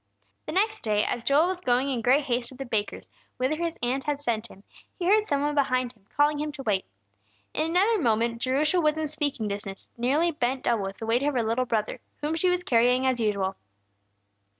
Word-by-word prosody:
The -, -, -3 dB
next 430 Hz, +3 st, +1 dB
day, 210 Hz, -1 st, +1 dB
as 240 Hz, -, -2 dB
Joel 280 Hz, +6 st, +4 dB
was 365 Hz, 0 st, -2 dB
going 255 Hz, -1 st, +1 dB
in 245 Hz, -3 st, -1 dB
great 260 Hz, +5 st, +4 dB
haste 245 Hz, -3 st, -1 dB
to 260 Hz, -, -12 dB
the 270 Hz, +2 st, -6 dB
baker's, 215 Hz, -4 st, -2 dB, 0.3 s
whither 260 Hz, +5 st, 0 dB
his 335 Hz, 0 st, -2 dB
aunt 260 Hz, +3 st, 0 dB
had 295 Hz, -2 st, -1 dB
sent 235 Hz, -5 st, -2 dB
him, 195 Hz, -, -16 dB, 0.3 s
he 355 Hz, -, -3 dB
heard 420 Hz, +3 st, +4 dB
some 285 Hz, -6 st, 0 dB
one 295 Hz, 0 st, 0 dB
behind 255 Hz, -3 st, +1 dB
him 205 Hz, -4 st, -31 dB
calling 295 Hz, 0 st, +3 dB
him 300 Hz, 0 st, -2 dB
to 275 Hz, -2 st, -7 dB
wait. 205 Hz, -5 st, 0 dB, 0.7 s
In 310 Hz, -, 0 dB
another 395 Hz, +5 st, +3 dB
moment 230 Hz, -1 st, +1 dB
Jerusha 300 Hz, +7 st, +2 dB
was 305 Hz, -1 st, +2 dB
in 315 Hz, -1 st, -1 dB
speaking 285 Hz, -7 st, -1 dB
distance, 200 Hz, -1 st, -6 dB
nearly 295 Hz, +8 st, +2 dB
bent 260 Hz, -3 st, -1 dB
double 230 Hz, -5 st, +1 dB
with 195 Hz, 0 st, -6 dB
the 225 Hz, -, -6 dB
weight 230 Hz, +3 st, +2 dB
of 290 Hz, 0 st, 0 dB
her 240 Hz, -, +2 dB
little 230 Hz, +3 st, 0 dB
brother, 220 Hz, -3 st, -1 dB, 0.2 s
whom 300 Hz, +2 st, -1 dB
she 330 Hz, +3 st, +2 dB
was 360 Hz, 0 st, 0 dB
carrying 250 Hz, 0 st, +3 dB
as 260 Hz, -2 st, +1 dB
usual. 200 Hz, -3 st, 0 dB
260 Hz, 220 wpm, -26 LUFS, 230-300 Hz, 0.7 s, Joel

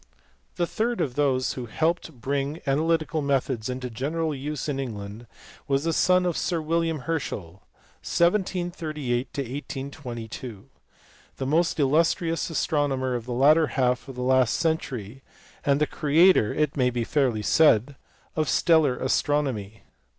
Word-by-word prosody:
The 175 Hz, -, +1 dB
third 230 Hz, +6 st, -2 dB
of 130 Hz, -, -1 dB
those 130 Hz, -2 st, +1 dB
who 125 Hz, -2 st, -6 dB
helped 165 Hz, +10 st, 0 dB
to -, -, -10 dB
bring 140 Hz, +3 st, -3 dB
ana 140 Hz, +1 st, +1 dB
lytical 160 Hz, -2 st, 0 dB
methods 130 Hz, -4 st, -1 dB
into 125 Hz, 0 st, -4 dB
general 155 Hz, +7 st, -2 dB
use 145 Hz, +1 st, -4 dB
in 140 Hz, -2 st, -2 dB
England 110 Hz, -2 st, -6 dB, 0.4 s
was 140 Hz, 0 st, +1 dB
the 165 Hz, 0 st, 0 dB
son 180 Hz, +2 st, +3 dB
of 175 Hz, -2 st, 0 dB
Sir 170 Hz, -2 st, -1 dB
William 165 Hz, -1 st, -1 dB
Herschel 100 Hz, -, -4 dB, 0.4 s
(1738 170 Hz, -8 st, -1 dB
1S22), 130 Hz, -5 st, -6 dB, 0.7 s
the 135 Hz, -, -3 dB
most 165 Hz, +4 st, +1 dB
illustrious 165 Hz, +4 st, +1 dB
astronomer 145 Hz, -5 st, 0 dB
of 120 Hz, -2 st, -3 dB
the -, -, -4 dB
latter 150 Hz, +5 st, +5 dB
half 125 Hz, 0 st, +1 dB
of 135 Hz, -, -8 dB
the 125 Hz, -, -4 dB
last 130 Hz, -2 st, +3 dB
century 135 Hz, -8 st, -2 dB, 0.4 s
and 140 Hz, 0 st, +2 dB
the 150 Hz, -, +3 dB
creator 155 Hz, -, +4 dB
(it 150 Hz, -2 st, 0 dB
may 125 Hz, -2 st, +2 dB
be 120 Hz, -1 st, -2 dB
fairly 120 Hz, -5 st, 0 dB
said) 140 Hz, 0 st, +4 dB, 0.4 s
of 155 Hz, -3 st, 0 dB
stellar 160 Hz, -7 st, +3 dB
astronomy. 130 Hz, -7 st, -1 dB
140 Hz, 145 wpm, -25 LUFS, 125-160 Hz, 0.7 s, latter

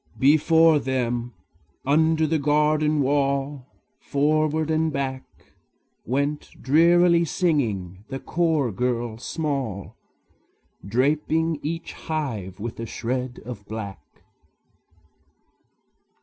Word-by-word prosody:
Before 155 Hz, +3 st, +5 dB
them, 120 Hz, -3 st, -2 dB, 0.5 s
under 160 Hz, +3 st, +3 dB
the 155 Hz, 0 st, +1 dB
garden 150 Hz, 0 st, +2 dB
wall, 140 Hz, -1 st, 0 dB, 0.3 s
Forward 155 Hz, +2 st, +1 dB
and 160 Hz, 0 st, +1 dB
back, 135 Hz, -2 st, -3 dB, 0.8 s
Went 140 Hz, +4 st, -1 dB
drearily 170 Hz, +4 st, +4 dB
singing 110 Hz, -, -1 dB
the 135 Hz, -, -5 dB
chore 160 Hz, -4 st, 0 dB
girl 120 Hz, +1 st, -2 dB
small, 135 Hz, -, -3 dB, 0.9 s
Draping 150 Hz, -, +1 dB
each 165 Hz, +2 st, -4 dB
hive 115 Hz, -, -4 dB
with 115 Hz, +2 st, -6 dB
a 115 Hz, -, -4 dB
shred 125 Hz, +3 st, -4 dB
of 115 Hz, -4 st, -7 dB
black. 100 Hz, -6 st, -6 dB
140 Hz, 90 wpm, -24 LUFS, 120-155 Hz, 0.9 s, Before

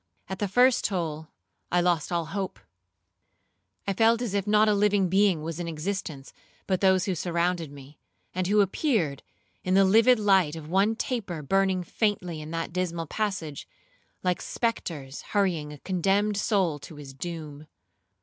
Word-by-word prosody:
At 190 Hz, 0 st, -5 dB
the 205 Hz, -, 0 dB
first 250 Hz, +5 st, +4 dB
toll 160 Hz, -5 st, -2 dB, 0.4 s
I 175 Hz, -, +3 dB
lost 175 Hz, -3 st, +1 dB
all 170 Hz, -1 st, 0 dB
hope. 195 Hz, +3 st, -4 dB, 1.3 s
I 195 Hz, -, 0 dB
felt 225 Hz, +3 st, +4 dB
as 220 Hz, -5 st, -3 dB
if 200 Hz, 0 st, -1 dB
not 215 Hz, +1 st, +4 dB
a 210 Hz, -, +4 dB
living 205 Hz, -2 st, +2 dB
being 190 Hz, -4 st, +3 dB
was 165 Hz, +1 st, -5 dB
in 175 Hz, -, -3 dB
existence 160 Hz, -3 st, -4 dB, 0.3 s
but 185 Hz, -2 st, 0 dB
those 190 Hz, -1 st, +4 dB
who 195 Hz, -, 0 dB
surrounded 170 Hz, -2 st, -1 dB
me, 140 Hz, +1 st, -13 dB, 0.3 s
and 185 Hz, 0 st, -1 dB
who 210 Hz, +1 st, +4 dB
appeared, 195 Hz, -, 0 dB, 0.4 s
in 185 Hz, 0 st, +1 dB
the 195 Hz, 0 st, +6 dB
livid 225 Hz, +6 st, +5 dB
light 190 Hz, -7 st, +3 dB
of 160 Hz, -2 st, -8 dB
one 195 Hz, +6 st, +2 dB
taper 200 Hz, -, -3 dB
burning 190 Hz, +3 st, +1 dB
faintly 180 Hz, -5 st, -1 dB
in 155 Hz, -, -8 dB
that 165 Hz, 0 st, -4 dB
dismal 170 Hz, -2 st, -2 dB
passage, 170 Hz, -5 st, -3 dB, 0.6 s
like 180 Hz, -1 st, 0 dB
spectres 155 Hz, -, -3 dB
hurrying 175 Hz, -8 st, 0 dB
a 150 Hz, -, -9 dB
condemned 195 Hz, +5 st, +1 dB
soul 195 Hz, -7 st, +1 dB
to 155 Hz, -, -11 dB
his 145 Hz, -2 st, -10 dB
doom. 155 Hz, -1 st, -7 dB
185 Hz, 160 wpm, -27 LUFS, 160-200 Hz, 1.3 s, the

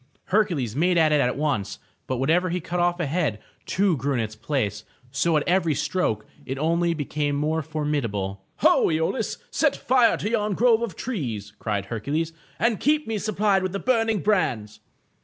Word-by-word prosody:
Hercules 170 Hz, -, +1 dB
made 175 Hz, +4 st, +2 dB
at 160 Hz, -2 st, +4 dB
it 150 Hz, -1 st, +4 dB
at 125 Hz, 0 st, 0 dB
once, 140 Hz, -9 st, -1 dB, 0.3 s
but 130 Hz, -, -1 dB
whenever 165 Hz, +8 st, +2 dB
he 180 Hz, +2 st, -1 dB
cut 175 Hz, +1 st, -3 dB
off 175 Hz, 0 st, +1 dB
a 170 Hz, -, 0 dB
head, 145 Hz, -7 st, 0 dB, 0.3 s
two 195 Hz, -2 st, +2 dB
grew 135 Hz, +2 st, -1 dB
in -, -, 0 dB
its 110 Hz, -1 st, -3 dB
place, 110 Hz, -4 st, -2 dB, 0.3 s
so 155 Hz, +4 st, +2 dB
at 150 Hz, -, -1 dB
every 170 Hz, -4 st, +2 dB
stroke 145 Hz, -, -1 dB, 0.2 s
it 135 Hz, -, -5 dB
only 170 Hz, +3 st, +1 dB
became 145 Hz, -1 st, -2 dB
more 155 Hz, +3 st, 0 dB
formidable. 125 Hz, -11 st, -2 dB, 0.2 s
Ho, -, -, +5 dB
lolaus, 160 Hz, +9 st, -1 dB
set -, -, +2 dB
fire 250 Hz, -3 st, +3 dB
to 210 Hz, -, -3 dB
yon 210 Hz, -3 st, 0 dB
grove 230 Hz, 0 st, +4 dB
of 235 Hz, -6 st, -2 dB
young -, -, -26 dB
trees," 115 Hz, -, -4 dB
cried 100 Hz, -3 st, -2 dB
Her 115 Hz, +2 st, -4 dB
cules, 155 Hz, +8 st, -1 dB, 0.3 s
"and 230 Hz, -2 st, +1 dB
keep 300 Hz, +1 st, +2 dB
me 220 Hz, -1 st, -2 dB
supplied 205 Hz, -1 st, +1 dB
with 185 Hz, -1 st, -2 dB
the 200 Hz, -, -2 dB
burning 225 Hz, -5 st, +1 dB
brands. 120 Hz, -, 0 dB
160 Hz, 190 wpm, -24 LUFS, 130-190 Hz, 0.3 s, Ho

